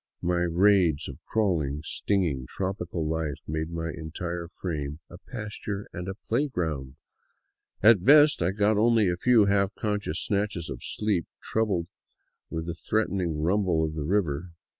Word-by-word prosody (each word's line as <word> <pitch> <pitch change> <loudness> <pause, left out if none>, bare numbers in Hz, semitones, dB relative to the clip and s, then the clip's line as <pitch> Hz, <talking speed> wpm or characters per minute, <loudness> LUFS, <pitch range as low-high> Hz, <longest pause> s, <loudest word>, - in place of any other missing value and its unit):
My 90 0 +1
riads 85 -3 +3
of 70 - -10
crawling, 80 -10 0
stinging 80 -8 -1
tropical 90 -4 -3
life 80 -3 -2
made 80 +1 -2
my 80 -1 -3
entire 85 +2 -5
frame 75 -5 -4
a 85 - -10
pas 105 -2 -7
ture 105 -1 -4
and 90 +2 -5 0.2
playground, 85 - -1 0.9
and 110 - +10
at 90 - -12
best 150 -1 +6
I 85 - +2
got 105 +2 +2
only 110 -3 +4
a 90 - 0
few 115 +3 +4
half 100 0 +2
conscious 105 -1 -2
snatches 100 -6 -1
of 60 - -6
sleep, 105 -6 -1
troubled 105 -6 0 0.6
with 80 0 -4
the 85 - -3
threatening 90 -4 -1
rumble 90 -2 +2
of 80 - -4
the 80 - -4
river. 85 -2 -1
90 Hz, 150 wpm, -27 LUFS, 80-105 Hz, 0.9 s, and